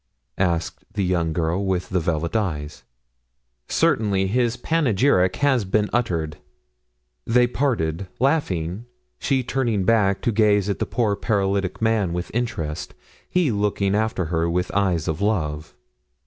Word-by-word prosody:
asked 85 -3 -1
the 100 - -1
young 85 -3 0
girl 85 +4 0
with 95 -2 -1
the 95 - +1
velvet 85 +2 -2
eyes. 75 -9 -2 0.9
"Certainly; 100 -3 +2
his 120 +4 +1
panegyric 120 - +2
has 140 -5 +2
been 105 +2 0
uttered." 85 -10 -1 0.9
They 125 +1 +4
parted, 105 - -1
laughing, 110 - 0 0.3
she 135 -2 +1
turning 120 -6 0
back 100 -2 +2
to 120 - +2
gaze 105 -2 +3
at 100 - -2
the - - -1
poor 110 -4 0
paralytic 100 -2 -1
man 110 -6 +1
with 90 +1 -4
interest, 85 -11 -3 0.3
he 180 -7 +2
looking 100 -1 0
after 110 -3 0
her 85 0 +1
with 90 +1 -1
eyes 90 -5 +1
of 80 +4 -2
love. 80 -8 -1
100 Hz, 135 wpm, -23 LUFS, 85-115 Hz, 0.9 s, They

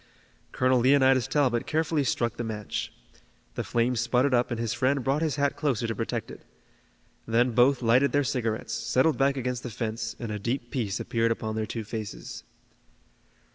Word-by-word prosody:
Colonel 130 0 +2
Leonidas 130 -1 +4
Talbot 130 -6 +1
carefully 155 -1 +1
struck 120 -3 -1
the 120 - -3
match. 105 -3 -4 0.6
The - - -3
flame 120 +2 0
sputtered 125 +3 +1
up 120 0 +2
and 120 - -3
his 115 -2 -1
friend 135 +1 +1
brought 135 +4 +1
his 155 -4 0
hat 140 0 0
closer 135 -6 -1
to 115 - -1
protect - - -4
it. - - -11 0.9
Then 120 +2 +2
both 125 +2 +3
lighted 125 +5 +4
their 145 0 +2
cigarettes, 115 -4 -2
settled 135 +7 +1
back 135 0 +2
against 125 -1 -2
the 125 - -6
fence, 110 0 -4
and 115 -3 -5
a 105 - -3
deep 120 +3 -3
peace 110 -7 -2
appeared 115 0 0
upon 110 -1 -3
their 110 -1 -2
two 115 +2 -4
faces. 110 -1 -7
120 Hz, 175 wpm, -27 LUFS, 115-135 Hz, 0.9 s, Leonidas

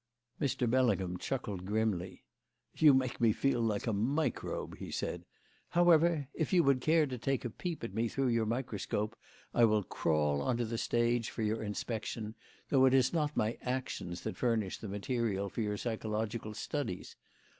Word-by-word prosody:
Mr. 130 -3 +1
Bellingham 105 -8 +2
chuckled 105 -9 -3
grimly. 100 -3 -1 0.5
"You 150 -4 +7
make 130 -2 0
me 115 -2 +5
feel 130 +2 +1
like 110 -3 0
a 115 - 0
microbe," 135 +10 -1
he - - -6
said. - - -3 0.4
"However, 170 -4 +4
if 160 - -2
you 180 -3 +5
would 135 -3 +3
care 160 +2 +4
to 130 -3 -5
take 135 +2 -1
a 120 - -2
peep 170 - -5
at 115 - -4
me 115 +2 +1
through 135 +3 0
your 115 -2 +1
microscope, 110 -2 -2 0.4
I 120 - +6
will 105 -2 +3
crawl 75 -4 +1
on 125 -2 0
to 120 - 0
the 115 0 -3
stage 120 -1 +1
for 115 - -4
your 110 +1 0
inspection, 110 +1 -4 0.4
though 130 -2 +5
it 130 0 +5
is 130 +2 +3
not 150 -3 0
my 110 +2 0
actions 125 -9 -3
that 110 - -5
furnish 115 -6 0
the 110 - -6
materials 100 -2 -1
for - - -3
your 105 -1 -1
psychological 110 -1 -3
studies. 125 -11 -4
115 Hz, 175 wpm, -33 LUFS, 105-130 Hz, 0.5 s, You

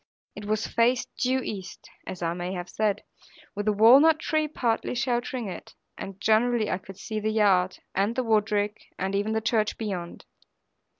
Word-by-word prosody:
It 210 - -8 0.2
faced 240 +3 +1
due 260 +1 +1
east 190 -6 -7 0.2
(as 180 -1 -6
I 165 0 0
may 175 +1 -4
have 175 -1 -5
said), 210 -2 0 0.5
with 205 +1 -4
the - - +5
walnut 260 +10 +7
tree 310 -1 0
partly 245 -5 -1
sheltering 240 -1 -1
it; 180 -3 -9 0.2
and 195 0 -8
generally 220 +1 +2
I 185 - -1
could 195 0 -12
see 215 -1 -4
the 215 +1 -1
yard, 195 -4 +3 0.2
and 200 +4 0
the 255 - 0
woodrick, 210 -2 0
and 190 +1 -2
even 205 +2 0
the 220 - 0
church 220 -2 0
beyond. 185 -6 -5
215 Hz, 170 wpm, -26 LUFS, 195-240 Hz, 0.5 s, walnut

